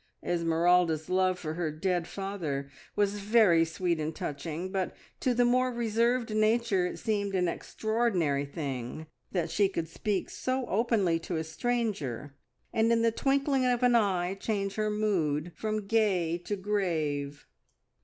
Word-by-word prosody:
Esmeralda's 170 -1 +2
love 185 0 +2
for 155 -3 -4
her 165 -1 -1
dead 175 +2 -1
father 165 -9 -4 0.2
was 205 0 +1
very 205 -5 +5
sweet 170 0 -1
and 155 +1 -3
touching, 160 +5 -4
but 190 -2 -2 0.2
to 250 -2 +1
the 245 +1 +4
more 255 +1 +3
reserved 235 0 +1
nature 215 -4 +2
it - - -6
seemed 200 -3 -1
an 180 -1 +2
extraordinary 185 -8 0
thing 140 -1 -5 0.3
that 170 -3 -1
she 200 -2 +3
could 170 -4 -3
speak 195 +4 -2
so 255 0 -2
openly 205 -6 +1
to 165 +1 -4
a 160 - -1
stranger, 160 - -2 0.4
and 225 +1 +3
in 230 0 +3
the 230 - +4
twinkling 275 +2 +1
of 250 -1 +1
an 245 -1 +5
eye 190 -5 +2
change 195 0 -2
her 215 0 0
mood 175 -7 0
from 215 -1 -2
gay 195 -6 +2
to 175 +4 -3
grave. 160 -8 -2
190 Hz, 150 wpm, -29 LUFS, 165-220 Hz, 0.4 s, very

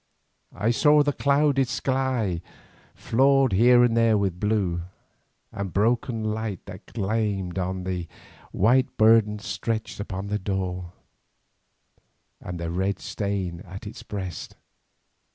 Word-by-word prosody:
I 105 +5 +1
saw 150 +4 +5
the 145 0 0
clouded 140 -1 +2
sky 125 -8 -1 0.5
flawed 135 -1 +3
here 120 +5 +6
and 120 -2 +3
there 115 -2 +4
with 95 -3 -1
blue, 100 -5 0 0.7
and 100 -1 -4
the - - -17
broken 115 +2 +1
light 110 -3 -3
that 100 0 -11
gleamed 100 -4 -1
on 95 0 -2
the 90 -2 -3 0.4
white 125 +7 +2
burden 110 -1 +5
stretched 110 +1 -4
upon 95 -1 -4
the 105 +1 -2
door, 90 -2 -3 1.5
and 90 -1 -7
the 85 -1 -3
red 95 +2 -1
stain 100 -6 -3
at 95 +3 -10
its 105 - -8
breast. 95 -4 -6
105 Hz, 125 wpm, -25 LUFS, 95-115 Hz, 1.5 s, here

